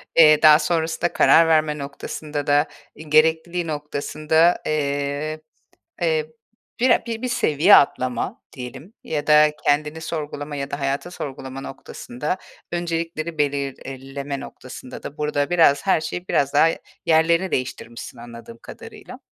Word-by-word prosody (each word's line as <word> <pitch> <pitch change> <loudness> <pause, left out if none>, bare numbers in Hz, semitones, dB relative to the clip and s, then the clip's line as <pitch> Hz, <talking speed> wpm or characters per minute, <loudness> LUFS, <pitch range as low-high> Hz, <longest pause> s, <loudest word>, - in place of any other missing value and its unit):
Eee, 155 -2 +7
daha 155 -1 +8
sonrasında 160 +1 -1
karar 165 0 +5
verme 155 -2 +2
noktasında 145 +1 -6
da, 145 0 +3 0.3
eee, 155 - -11
gerekliliği 160 +3 +2
noktasında, 155 +2 +1
eee, 145 +1 -2 0.6
eee, 475 -2 +1 0.5
bire 250 0 +4
bir 230 +2 -3
seviye 170 - +4
atlama 130 -3 +1
diyelim, 130 - -9
ya 150 -2 -3
da 150 0 +6
kendini 150 +2 +1
sorgulama 150 -2 -5
ya 140 0 -4
da 140 - -4
hayatı 140 +5 -2
sorgulama 135 -5 -7
noktasında 135 +3 -5 0.4
öncelikleri 165 -1 -3
belirleme 140 -1 -3
noktasında 130 0 -10
da 145 - -9
burada, 150 -1 -1
biraz, 160 -5 +4
her 190 - +3
şey, 175 +3 -6
biraz, 140 -1 +1
daha 150 +3 +6 0.4
yerlerini 170 +3 +3
değiştirmişsin 120 -3 -5
anladığım 115 -1 -11
kadarıyla. - - -11
150 Hz, 125 wpm, -22 LUFS, 140-165 Hz, 0.6 s, daha